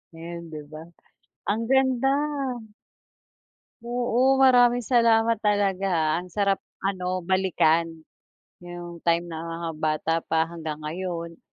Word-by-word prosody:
Ngayon 170 +1 -7
di 155 -1 -8
ba, 155 - -8 0.7
ang 215 +3 0
ganda. 265 0 +3 1.7
Oo, 245 +2 +1
maraming 245 -2 +5
salamat 230 -1 +3
talaga 200 -2 +1
ah 160 -2 +2
ang 180 - -14
sarap 200 -1 +1 0.3
ano 185 -1 -2
balikan, 175 -3 +2 0.8
yung 175 -1 -9
time 170 0 +2
na 165 -1 -6
mga 165 0 -5
bata 155 +1 0
pa 160 0 +1
hanggang 160 -3 -6
ngayon. 170 +1 -5
180 Hz, 115 wpm, -25 LUFS, 165-230 Hz, 1.7 s, maraming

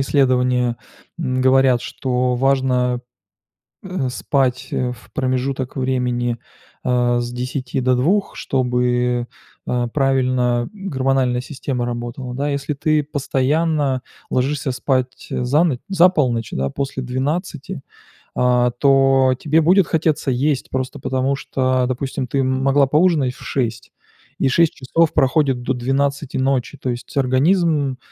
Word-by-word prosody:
исследования, 125 -3 +2 0.4
м, 130 0 -1
говорят, 130 -1 +4
что 125 -1 -1
важно, 125 -1 +1 0.8
э, 180 -9 -2
спать, 130 -1 0
э, 125 -1 -1
в 125 - -13
промежуток 130 -1 -2
времени, 125 -2 -1 0.5
а, 120 -1 +2
с 120 0 -3
10 125 +1 -3
до 125 0 +2
2, 185 +11 +1
чтобы, 125 -1 0 0.4
э, 120 -1 0
правильно, 130 -3 +1
м, 195 -1 -7
гормональная 130 -2 +1
система 130 -2 -4
работала. 120 +1 -5
Да, 145 +2 -1
если 140 +1 -2
ты 155 +2 +2
постоянно 145 0 0 0.3
ложишься 135 +1 0
спать, 130 0 -2
э, 125 - -1
за 145 +6 +3
но 150 -8 +1
за 185 -1 +5
полночь, 125 - 0
да, 70 +1 -1
после 135 - -4
12. 140 +5 -3 0.5
А, 125 -1 +3
то 135 0 +3
тебе 155 +3 +2
будет 180 +2 +4
хотеться 155 -3 0
есть, 135 +2 0
просто 130 +2 -3
потому, 130 +1 -1
что, 130 -2 0
допустим, 130 0 -3
ты 140 - -2
м 130 0 0
могла 135 0 +4
поужинать 150 -4 +2
в - - -15
6:00 120 -2 -3 0.5
и 135 - +2
6 165 +4 +3
часов 160 +5 +1
проходит 135 -1 +2
до 130 - -1
12:00 140 +3 -1
ночи. 135 +1 0
То - - -4
есть 120 0 -6
организм 140 0 +2
130 Hz, 135 wpm, -20 LUFS, 125-140 Hz, 0.8 s, за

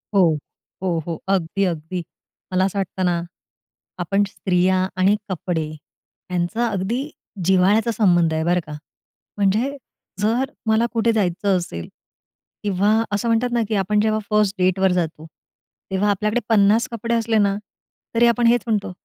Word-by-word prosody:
हो, 170 -5 +4 0.5
हो, 175 -3 0
हो, 165 -2 -4
अगदी, 195 0 0
अगदी. 170 +1 -3 0.5
मला 185 +1 +3
असं 195 +1 -2
वाटतं 185 0 -2
ना, 175 -1 +2 0.8
आपण 195 +4 +1
स्त्रिया 185 -1 +1
आणि 190 +3 +4
कपडे 175 -3 -2 0.7
यांचा 180 +7 0
अगदी 205 +3 -1 0.5
जिव्हाळ्याचा 190 +5 +3
संबंध 175 -7 +3
आहे, 160 0 0
बरं 175 +2 +2
का. 150 - -7 0.6
म्हणजे 215 +8 +1 0.5
जर 240 +6 +1
मला 220 +1 +3
कुठे 230 0 +2
जायचं 195 -1 +1
असेल 85 - -5 0.8
किंवा 205 +1 +2 0.2
असं 205 +3 -1
म्हणतात 230 +2 +2
ना 240 - +2
की 220 - 0
आपण 205 +2 +1
जेव्हा 215 0 +1
फर्स्ट 210 -1 +2
डेटवर 185 +1 +3
जातो, 165 -3 -2 0.7
तेव्हा 195 +2 +1
आपल्याकडे 210 +4 0
50 215 +1 +4
कपडे 230 0 -3
असले 225 -1 +1
ना 200 -2 +3 0.6
तरी, 235 +1 +5
आपण 235 0 +3
हेच 240 0 +4
म्हणतो, 210 -4 0
195 Hz, 145 wpm, -21 LUFS, 180-220 Hz, 0.8 s, तरी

